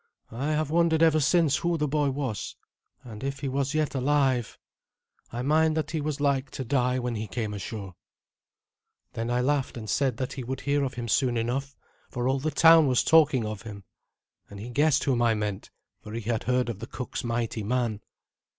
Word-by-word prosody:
I 130 +5 -3
have 155 -1 -1
wondered 165 -1 +3
ever 160 -1 +4
since 155 -1 +3
who 170 0 0
the 150 -1 0
boy 145 0 +1
was, 130 -6 -4 0.5
and 110 -2 -10
if 140 +1 -4
he 140 - -2
was 140 +2 -1
yet 155 -1 0
alive. 135 -3 +1 0.7
I 120 +2 -4
mind 155 +3 +2
that 155 -2 -2
he 160 -2 -2
was 150 -1 -3
like 140 -1 +1
to 130 - -4
die 125 0 +1
when 125 -1 -2
he 110 -1 -4
came 110 0 -3
ashore." 100 -1 -6 1.2
Then 115 +1 -3
I 120 0 +1
laughed, 135 -1 0
and 110 -2 -7
said 130 +2 0
that 130 0 -3
he 130 - -6
would 130 +2 -5
hear 145 0 +1
of 130 - -3
him 120 -1 -4
soon 120 +1 +1
enough, 130 +4 -2 0.3
for 120 0 -2
all 135 +1 +1
the 155 +4 -1
town 160 +1 +6
was 125 -2 +2
talking 150 -7 +4
of 105 -2 -5
him; 105 -3 -9 0.7
and 100 - -10
he 115 +4 -7
guessed 145 +2 +3
whom 125 -4 +1
I 115 -2 +3
meant, 105 -2 -4 0.3
for 105 - -10
he 115 - -3
had 115 0 -2
heard 125 0 +1
of 110 -4 -5
the 115 - -7
cook's 125 - -5
mighty 115 -1 -2
man. 115 -1 -1
130 Hz, 205 wpm, -27 LUFS, 115-145 Hz, 1.2 s, town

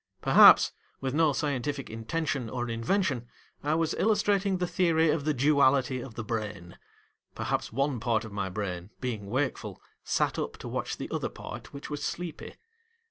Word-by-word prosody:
Perhaps, - - +8 0.3
with 130 -1 -2
no 155 0 +4
scientific 140 -1 -2
intention 125 +2 -2
or 120 +1 -3
invention, 120 - 0 0.4
I 150 +2 +1
was 165 -1 +1
illustrating 205 -2 +2
the 180 - 0
theory 165 -3 +2
of 150 -2 -1
the 155 - +2
Duality 135 -3 +3
of 120 -3 -9
the 115 - -4
Brain; 105 -5 -5 0.6
perhaps - - -2
one 135 +1 0
part 115 -1 0
of 110 - -9
my 95 -2 -2
brain, 90 -2 -4
being 110 -6 -4
wakeful, 130 +4 -2 0.2
sat - - 0
up - - -4
to - - -8
watch - - -3
the - - -6
other - - -2
part - - -9
which 140 +1 -8
was 145 0 -4
sleepy. 170 0 -5
135 Hz, 165 wpm, -28 LUFS, 115-160 Hz, 0.6 s, Perhaps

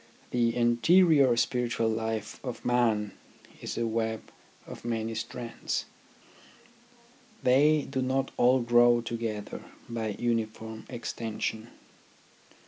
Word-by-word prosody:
The 120 -1 +1
interior 130 +3 +4
spiritual 120 -1 0
life 110 -1 -3
of 125 -3 -6
man 115 -4 +2 0.5
is - - -5
a 115 - 0
web 110 -1 -2 0.3
of - - -10
many 115 -1 -2
strands. 115 +1 -4 1.6
They 145 +4 +4
do 130 -1 -2
not 130 +1 0
all 125 +1 +4
grow 120 0 +5
together 115 -3 -4 0.2
by 110 -3 -3
uniform 110 -1 -3
exten 115 -3 -5
sion. 110 +1 -2
115 Hz, 105 wpm, -28 LUFS, 110-125 Hz, 1.6 s, grow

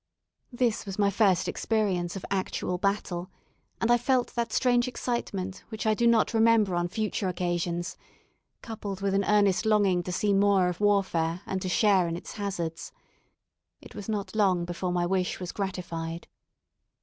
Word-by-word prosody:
This 240 -4 0
was 195 - -5
my 200 -1 +3
first 195 -3 +3
experience 195 -6 -1
of 195 - -6
actual 185 -2 -2
battle, 190 -2 -1 0.5
and 230 - +2
I 240 - +5
felt 245 0 +1
that 235 -2 -2
strange 245 0 +2
excitement 200 -7 -3
which 220 -1 -5
I 220 - +4
do 235 +2 +2
not 230 -1 +3
remember 225 -3 +4
on 175 0 0
future 210 0 -2
occasions, 175 0 -2 0.7
coupled 205 -4 -6
with 195 -1 0
an 200 0 +2
earnest 205 -2 +3
longing 205 -5 +3
to 180 - -5
see 200 +3 +1
more 195 -2 +4
of 180 +2 -6
warfare, 185 -5 +1
and 190 -1 -3
to 185 - -3
share 195 -3 +3
in 165 0 -3
its - - -9
hazards. 175 -5 -4 0.9
It - - -14
was 205 +1 -8
not 205 -2 -3
long 185 -5 +2
before 175 +1 -3
my 175 -1 +1
wish 185 0 -1
was 180 -2 -5
gratified. 170 -4 -4
195 Hz, 165 wpm, -27 LUFS, 180-215 Hz, 0.9 s, I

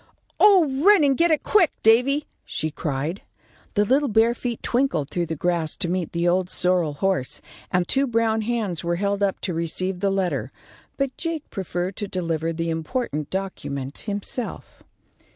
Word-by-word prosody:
"Oh, 390 -6 +7 0.2
run 405 -4 +7
and 275 -2 +4
get 340 +5 +3
it, 310 -2 +2
quick, 370 -7 +4
Davy," 250 +7 +4 0.2
she 155 - -2
cried. 150 +4 -3 0.5
The 205 0 +3
little 275 +6 +3
bare 225 +1 +4
feet 240 -1 -4
twinkled 240 - 0
through 175 -1 -1
the 160 - -3
grass 170 -1 -1
to 190 - -2
meet 175 -1 -2
the 170 +1 0
old 180 +1 +2
sorrel 180 -5 +1
horse, 180 -3 -1 0.3
and 180 -1 +1
two 275 +1 +2
brown 225 -2 +1
hands 215 -6 -2
were 170 0 0
held 200 +2 -1
up 200 -1 +1
to 180 - -2
receive 180 +3 -2
the 200 +1 +1
letter; 195 -2 -1 0.5
but 275 -2 -1
Jake 330 -3 -3
preferred 185 -1 -3
to 205 - -3
deliver 165 -3 -2
the 165 0 -2
important 160 - -3
document 145 -8 -4
himself. 205 +3 -5
190 Hz, 170 wpm, -24 LUFS, 170-240 Hz, 0.5 s, Oh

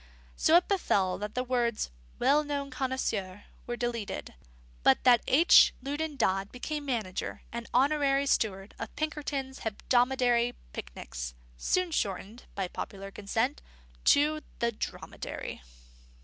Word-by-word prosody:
So 320 - +4
it 355 - +1
befell 200 - +1
that 210 +2 -5
the 250 - 0
words 240 - 0 0.3
"well 285 +4 +4
known 285 -2 -3
connoisseur" 225 -7 -2 0.2
were 240 0 -3
deleted; 235 -3 -3 0.5
but 130 - +4
that 245 -2 +6
H. 320 +7 +7
Loudon 295 +2 -2
Dodd 195 -5 +1
became 295 +4 -4
manager 220 -9 -3
and 235 0 -5
honorary 280 +1 +3
steward 200 -6 0
of - - -6
Pinkerton's 285 -3 -3
Hebdomadary 245 +2 +2 0.2
Picnics, - - -6 0.2
soon 365 - 0
shortened, 205 - -2
by 195 -2 -1
popular 195 +2 -6
consent, 200 - -1 0.4
to 305 +2 +4 0.2
the 235 0 +1
Dromedary. 215 - -6
245 Hz, 120 wpm, -30 LUFS, 205-280 Hz, 0.5 s, H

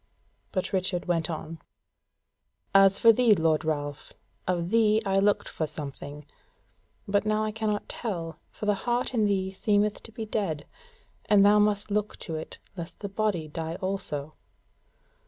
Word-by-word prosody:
But 185 0 -2
Richard 185 -1 0
went 170 -2 0
on: 160 0 -5 1.1
"As 195 0 +7
for 230 - +7
thee, 230 -2 +5
lord 160 -2 +2
Ralph, 145 -2 -3 0.3
of 175 0 0
thee 220 -1 +4
I 195 0 +2
looked 205 +1 +2
for 155 - -3
something; 145 0 -7 0.8
but 200 0 +2
now 215 0 +1
I 215 - -1
cannot 215 -1 -2
tell; 170 -8 -4
for - - -7
the 210 - +4
heart 240 +5 -1
in 220 -3 +3
thee 190 -2 0
seemeth 205 +1 +1
to 225 - -11
be 225 0 -5
dead; 180 -9 -2 0.6
and 200 -1 +5
thou 210 +1 +6
must 205 0 +1
look 210 0 -1
to 165 - -5
it 155 - -6 0.2
lest 170 -2 -8
the 200 - -4
body 195 -6 -1
die 160 +1 -4
also." 175 -6 -4
195 Hz, 155 wpm, -27 LUFS, 165-210 Hz, 1.1 s, As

